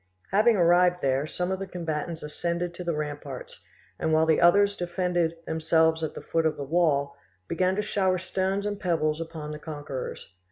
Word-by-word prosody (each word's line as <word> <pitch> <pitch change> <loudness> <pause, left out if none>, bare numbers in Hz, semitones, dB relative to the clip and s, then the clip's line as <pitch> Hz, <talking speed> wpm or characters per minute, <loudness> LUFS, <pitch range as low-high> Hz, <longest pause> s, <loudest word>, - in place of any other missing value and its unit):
Having 220 +4 +5
arrived 180 0 +4
there, 135 +2 +1
some 180 +3 -2
of 190 - -2
the 195 - -4
combatants 165 -2 -4
ascended 170 +3 -3
to 180 - -7
the 170 -2 -1
ramparts, 145 -3 -6 0.4
and 160 - 0
while 160 0 +4
the 160 0 +3
others 200 +4 +5
defended 175 -2 -1
themselves 160 0 +2
at 160 - -3
the - - -7
foot 165 -1 +1
of 155 - -2
the 140 - -4
wall, 140 -2 +1 0.3
began 185 +2 +1
to 210 - -1
shower 190 -3 +1
stones 190 +2 -1
and 205 -1 -2
pebbles 160 -3 0
upon 160 -2 -6
the 150 - -6
conquerors. 145 - -6
170 Hz, 185 wpm, -27 LUFS, 155-180 Hz, 0.4 s, Having